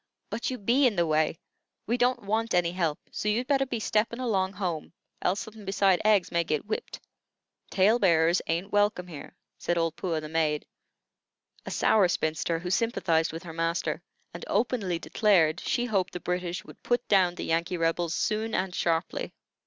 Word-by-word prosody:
"But 225 +2 -2
you 255 - -3
be 250 +6 +3
in 225 - 0
the 170 -1 +2
way. 155 0 +1 0.5
We 235 - 0
don't 245 -1 +1
want 220 +1 0
any 175 -1 +2
help, 170 -4 -1
so 210 - -2
you'd 230 +4 +1
better 270 0 +2
be 240 -2 -3
steppin' 220 +2 0
along 195 -6 0
home, 175 -6 -4 0.3
else 195 +5 0
suthin' 220 -2 -10
besides 195 -2 +2
eggs 210 -3 +3
may 170 -1 +2
git 155 0 -2
whipped. 215 - -4 0.7
Tale 210 +5 +3
bearers 170 -3 +4
ain't 175 +5 -2
welcome 205 -3 +2
here," 165 -5 -10 0.2
said 175 - -1
old 165 -1 0
Puah, 165 -3 -2
the 155 - -7
maid, 155 -1 0 1.0
a - - -2
sour 210 -4 +3
spinster, 160 -1 -1
who 175 +2 -4
sympathized 170 -7 +1
with 165 +3 -7
her 165 -2 -8
master, 165 +2 -1 0.3
and 170 - -8
openly 205 -5 0
declared 175 -4 +2
she 245 - -1
hoped 195 -6 0
the 180 - -4
British 180 0 -3
would - - -14
put 245 0 0
down 185 -3 +3
the - - -5
Yankee 170 +2 0
Rebels 165 0 0
soon 220 +1 -1
and 185 -1 -1
sharply. 165 -1 -1
185 Hz, 180 wpm, -28 LUFS, 165-215 Hz, 1.0 s, bearers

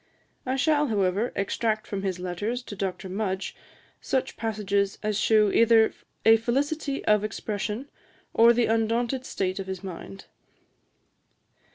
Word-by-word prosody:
I 260 - +1
shall, 295 +2 +2
however, 205 +1 +1
extract 215 +2 -1
from 200 -1 -4
his 190 -2 -2
letters 205 +8 -3
to 205 - -8
Dr. 190 -1 -3
Mudge 190 0 -3 0.5
such 265 - -1
passages 200 -3 -1
as 215 -1 0
shew 215 -2 +4
either 230 0 +5 0.3
a 225 0 +8
felicity 275 +5 -1
of 210 -1 +4
expression, 215 +3 -3 0.5
or 230 +1 +7
the 235 0 +3
undaunted 230 +3 0
state 185 0 -2
of 190 - -5
his 190 0 -5
mind. 165 - -8
215 Hz, 135 wpm, -26 LUFS, 195-235 Hz, 0.5 s, a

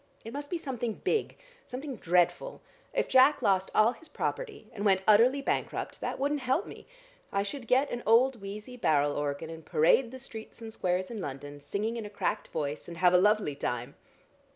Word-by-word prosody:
It 225 - -7
must 285 0 -6
be 350 - -1
something 245 -7 -3
big, 445 - -1 0.3
something 265 +2 -6
dreadful. 180 - +1 0.3
If - - 0
Jack 265 +3 +5
lost 190 -1 +2
all 215 +2 +5
his 320 +5 -13
property, 435 - -4
and 205 - -5
went 190 -2 +3
utterly 245 +6 +5
bankrupt, - - -2
that - - -3
wouldn't 285 +2 0
help 265 - 0
me. - - -11 0.4
I 200 - +1
should 240 +4 -6
get 265 +4 +3
an 240 - -3
old 235 +1 +4
wheezy 210 +5 -7
barrel 145 -9 +2
organ 145 +2 -3
and 165 0 -9
parade 165 - +3
the 260 - -9
streets 225 -5 -10
and 225 -1 -8
squares 185 +2 -1
in 220 -4 -5
London, 145 -1 -7
singing 210 +10 -2
in 225 - -5
a - - -10
cracked 205 - -2
voice, 150 -1 -4
and 170 -1 -8
have 180 0 +4
a 180 - +7
lovely 210 -5 +3
time. 125 -3 -3
215 Hz, 195 wpm, -29 LUFS, 180-260 Hz, 0.4 s, a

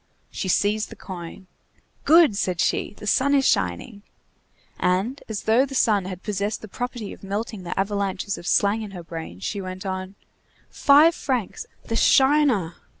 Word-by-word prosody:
She 190 - -4
seized 210 +3 +1
the - - -10
coin. 180 0 -9 0.6
"Good!" 320 -7 +6
said 185 -3 -1
she, - - 0
"the - - -10
sun 275 +7 +2
is 270 -1 +3
shining!" 90 - -1 0.8
And, 190 +9 0
as 215 -2 -4
though 225 +4 +4
the 275 0 -5
sun 210 -7 +2
had 185 -1 -7
possessed 205 +1 -3
the - - -7
property 240 -1 -5
of - - -16
melting 205 +1 -4
the 175 +1 -5
avalanches 200 0 -1
of 175 - -9
slang 205 +2 +2
in 215 - -6
her 175 - -8
brain, 160 - -8
she 195 - -3
went 185 +1 -7
on:— 190 0 -4 0.6
"Five 300 +4 +5
francs! 270 - -3 0.2
the - - -4
shiner! 265 - +3
205 Hz, 165 wpm, -23 LUFS, 185-245 Hz, 0.8 s, Good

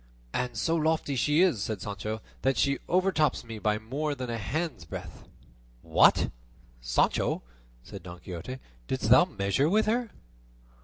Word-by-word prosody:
"And 125 -2 -2
so 165 +9 +1
lofty 155 -3 +1
she 150 +6 +3
is," 165 - +2
said 105 0 -2
Sancho, 105 +2 -5 0.2
"that 135 0 +1
she 140 0 +2
overtops 180 -6 +2
me 115 -2 -7
by 105 0 +1
more 140 +7 -3
than 125 -3 -4
a 115 - -2
hand's 145 - -3
breadth." 85 -2 -9 0.6
"What! - - +4 0.5
Sancho," - - +1 0.4
said 100 - -9
Don 90 0 -10
Quixote, 90 +9 -7 0.3
"didst - - -1
thou - - +8
measure 100 +9 0
with 215 +4 +3
her?" 235 +1 0
125 Hz, 150 wpm, -28 LUFS, 100-155 Hz, 0.6 s, thou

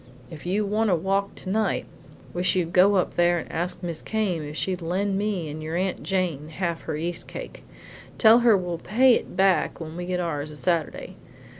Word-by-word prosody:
If 160 +2 -9
you 205 +3 +1
want 215 +2 +1
a 180 - +4
walk 195 +4 -1
tonight, 210 +3 -1
I - - -21
wish 180 +2 +2
you'd 175 -2 -1
go 195 +3 +6
up 185 - 0
there 175 0 +4
and 165 - -6
ask 175 +3 -3
Mis' 170 -2 -3
Came 205 -7 -1
if 150 +1 -7
she'll 185 -2 -1
lend 190 +4 -1
me 200 -4 -1
an' 155 +1 -6
your 160 +1 -4
Aunt 185 +1 -1
Jane 175 -6 -1
half 170 0 -3
her 155 -2 -3
yeast 170 +2 -4
cake. - - -8 0.5
Tell 225 +1 +7
her 235 -4 +5
we'll 175 -2 -3
pay 245 +8 +4
it - - -2
back 190 -1 +2
when 160 -1 -7
we 175 0 -5
get 180 0 -1
ours 155 -4 -2
a 150 - -7
Saturday. 165 0 -1
180 Hz, 205 wpm, -25 LUFS, 165-195 Hz, 0.5 s, Tell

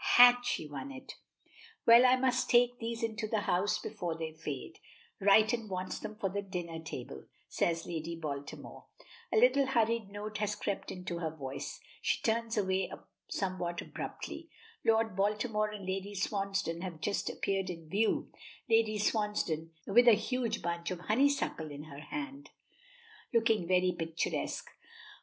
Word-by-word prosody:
Had 245 0 +9
she 245 -9 -1
won 150 - -6
it? 265 -1 -9 0.7
"Well, 235 +2 +9
I 250 - +6
must 255 -1 +1
take 245 0 +4
these 230 0 -3
into 220 -1 -2
the 215 -1 0
house 200 +2 +1
before 175 -6 -4
they 160 -1 -4
fade. 150 -4 -6 0.4
Righton 215 +3 +4
wants 185 0 -3
them 215 - -6
for 210 -2 -1
the 200 +2 -2
dinner 175 -4 -5
table," 125 - -7 0.2
says 165 -1 0
Lady 165 0 -4
Baltimore. 145 -3 -6 0.4
A - - +2
little 260 +4 +5
hurried 230 -4 +1
note 210 +1 -5
has 210 0 0
crept 200 - -3
into 180 -2 -5
her 165 -2 -1
voice. 140 -4 -6 0.2
She - - +1
turns 230 0 0
away 190 -2 +1 0.4
somewhat 180 -3 -2
abruptly. - - -6 0.3
Lord 225 -3 +3
Baltimore 210 +2 +1
and 210 -2 -7
Lady 195 +2 -3
Swansdown 195 -3 -1
have 180 -4 -5
just 200 +6 -1
appeared 195 -1 -1
in 165 -3 -7
view, 210 +7 +1 0.4
Lady 225 -2 +3
Swansdown 210 -7 0 0.2
with 240 +5 +5
a 235 - +10
huge 230 +1 -1
bunch 170 0 -2
of 180 -2 -4
honeysuckle 230 - +1
in 145 0 -7
her 145 -2 -10
hand, 285 - -6 0.8
looking 225 -6 +2
very 185 0 +3
picturesque. 165 -2 -2
200 Hz, 150 wpm, -32 LUFS, 170-225 Hz, 0.8 s, a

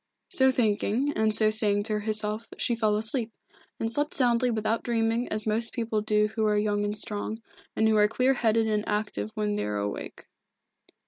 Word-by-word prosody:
So 265 0 +4
thinking, 240 +3 0
and 215 0 +1
so 215 0 +4
saying 205 -2 +3
to 215 -1 0
herself, 215 +1 0
she 240 - +1
fell 215 -2 +1
asleep, 220 +2 +1 0.5
and 225 0 -2
slept 295 +7 -1
soundly 250 -3 +2
without 225 0 -1
dreaming 230 0 -1
as 215 0 -3
most 225 +2 -1
people 225 -3 -2
do 210 0 +1
who 220 0 -3
are 210 0 +2
young 205 0 0
and 205 +1 -3
strong, 210 +1 -3 0.4
and 220 - +2
who 220 -1 +3
are 210 0 +5
clear 255 +5 +1
headed 225 -3 +1
and 210 -1 0
active 210 0 -2
when 210 -1 -1
they - - -2
are 105 0 -3
awake. 100 0 -5
220 Hz, 190 wpm, -27 LUFS, 210-230 Hz, 0.5 s, are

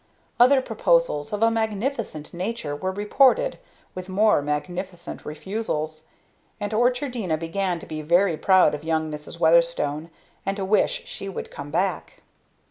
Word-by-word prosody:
Other 260 +2 +6
proposals, 170 - +1
of 210 +1 -1
a 230 - +5
magnificent 220 - -2
nature, 180 -4 -3
were 185 +6 -2
reported, 265 - +3 0.3
with 185 +1 -7
more 205 -3 +3
magnificent 175 +5 -4
refusals; 155 -2 -4 0.5
and 205 +1 -3
Orchardina 245 - +1
began 175 +2 -2
to - - -10
be 155 -1 -5
very 170 +3 +3
proud 185 0 +4
of 150 - -5
young 160 -1 -1
Mrs. 150 +2 -8
Weatherstone 165 -2 +2 0.3
and 195 +1 -2
to 195 - -2
wish 210 +2 +2
she 195 - -6
would 195 - -6
come 140 +1 -8
back. 180 +3 -2
185 Hz, 140 wpm, -24 LUFS, 155-215 Hz, 0.5 s, Other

